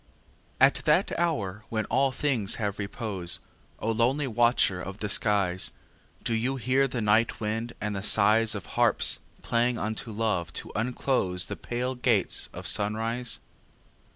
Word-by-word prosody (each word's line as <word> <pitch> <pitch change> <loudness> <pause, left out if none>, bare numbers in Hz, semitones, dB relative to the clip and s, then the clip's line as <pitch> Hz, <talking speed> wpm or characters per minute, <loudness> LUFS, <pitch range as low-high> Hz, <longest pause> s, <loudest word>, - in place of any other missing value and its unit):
III - - -30
At - - -4
that - - +2
hour 105 - -2
when 110 -1 -2
all 135 0 +1
things 130 -7 -1
have 105 -2 -3
repose, 100 -3 -1 0.4
O 115 - -2
lonely 125 +6 +1
watcher 120 -6 +2
of 95 +2 -7
the 105 - -4
skies, 100 -3 +2 0.5
Do 115 - -1
you 120 +4 -1
hear 130 +2 +1
the 125 -2 -4
night 110 +2 +2
wind 115 +2 -3
and 105 -1 -3
the 95 - -3
sighs 110 +2 +4
Of 100 - -6
harps - - +4 0.2
playing 120 +1 0
unto 110 +2 -3
Love 105 -6 -2
to - - -5
unclose 110 -5 0
The - - -5
pale 125 +2 -4
gates 120 -6 +1
of - - -9
sunrise? 115 +4 +1
110 Hz, 155 wpm, -27 LUFS, 105-125 Hz, 0.5 s, sighs